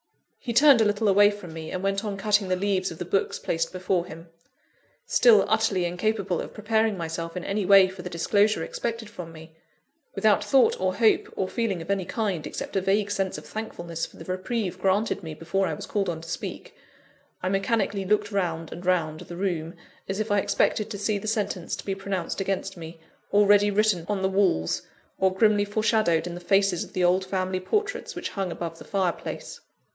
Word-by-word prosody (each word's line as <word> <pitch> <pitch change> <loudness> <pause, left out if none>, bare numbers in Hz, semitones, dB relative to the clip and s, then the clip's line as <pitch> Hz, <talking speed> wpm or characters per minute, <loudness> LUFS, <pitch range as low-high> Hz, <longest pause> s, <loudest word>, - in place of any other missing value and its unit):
He 245 - -4
turned 275 -1 +7
a - - +4
little 205 +1 +1
away 205 +1 +6
from 205 -5 -8
me, 160 -1 -7
and 185 - -4
went 195 +1 0
on 205 -2 -3
cutting 205 0 +2
the 185 - +1
leaves 190 0 0
of 165 - -8
the 180 - -5
books 195 +3 0
placed 165 0 -2
before 185 -1 -1
him. 165 0 -11 0.8
Still 465 -3 +5
utterly 220 -5 +2
incapable 185 +1 -1
of - - -9
preparing 220 -1 +1
myself 165 0 -4
in 180 - -5
any 200 +1 -1
way 195 0 +7
for 190 -1 -9
the 180 - -6
disclosure 200 +5 +2
expected 230 -2 -4
from 180 -6 -9
me; 160 0 -13 0.6
without 215 -2 +3
thought 270 -2 +4
or 185 0 +1
hope, 225 -2 +3
or 190 - -1
feeling 195 -5 -2
of 190 - -4
any 195 -2 0
kind, 200 -8 -2
except - - -6
a 195 - +2
vague 200 +2 +1
sense 195 -2 -1
of - - -10
thankfulness 175 -7 -5
for - - -18
the 165 - -10
reprieve 185 +1 -3
granted 195 +4 +1
me 160 -3 -7
before 185 +5 -1
I 160 - -2
was - - -7
called 200 -3 -1
on 160 -2 -4
to 165 - -11
speak 165 - -6 0.7
I 185 - 0
mechanically 195 0 0
looked 210 +2 +1
round 165 -5 -2
and 175 - -8
round 165 -4 0
the 175 - -9
room, 175 -3 -2 0.3
as 195 +1 -2
if 215 0 -2
I 205 - +4
expected 215 +2 +1
to 210 - -5
see 205 +1 -1
the 215 - -7
sentence 210 -5 -2
to - - -10
be 195 - -1
pronounced 195 -1 -3
against 195 -1 -2
me, 165 -1 -9 0.3
already 205 0 +5
written 205 -4 +1
on 200 -2 -1
the 190 - +2
walls, 190 - +1 0.4
or 190 0 +3
grimly 205 +1 +3
foreshadowed 210 -5 +1
in 175 - -5
the 175 - -6
faces 195 -1 +2
of - - -13
the 185 - 0
old 180 +2 +3
family 185 0 -2
portraits 400 - -2
which - - -4
hung 195 -3 -3
above 165 -1 -5
the - - -11
fireplace. 190 -4 -3
195 Hz, 205 wpm, -26 LUFS, 175-210 Hz, 0.8 s, turned